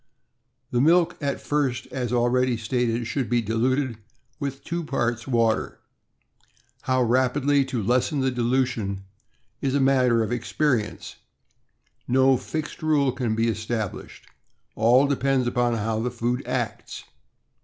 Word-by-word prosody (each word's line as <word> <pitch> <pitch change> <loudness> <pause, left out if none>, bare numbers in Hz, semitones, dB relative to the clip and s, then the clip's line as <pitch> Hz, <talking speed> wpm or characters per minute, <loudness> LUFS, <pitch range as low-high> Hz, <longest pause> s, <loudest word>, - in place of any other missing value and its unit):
The 120 - +2
milk 170 +3 +4
at 140 -1 -1
first, 140 -5 -1
as 125 -3 -3
already 125 0 +2
stated, 115 +1 -1
should 130 +1 -2
be 120 0 +2
diluted 120 +2 0 0.4
with 140 -1 -4
two 170 0 -3
parts 120 -5 -2
water. 115 -3 0 1.1
How 130 -1 +3
rapidly 130 +4 +2
to 125 -4 -3
lessen 125 - +1
the 130 0 +1
dilution 120 -5 -1 0.6
is 135 0 0
a - - +3
matter 130 -4 +3
of 110 - -4
experi 120 -1 0
ence— - - -11 0.9
no 130 +1 +4
fixed 155 +5 -5
rule 150 -4 +2
can 120 -3 -2
be 115 +1 +1
established; 110 -1 -4 0.5
all 120 +5 +4
depends 135 -2 +1
upon 120 -1 +1
how 110 0 -1
the 120 +2 -1
food 120 +1 -2
acts. 125 -3 -4
125 Hz, 135 wpm, -24 LUFS, 115-135 Hz, 1.1 s, milk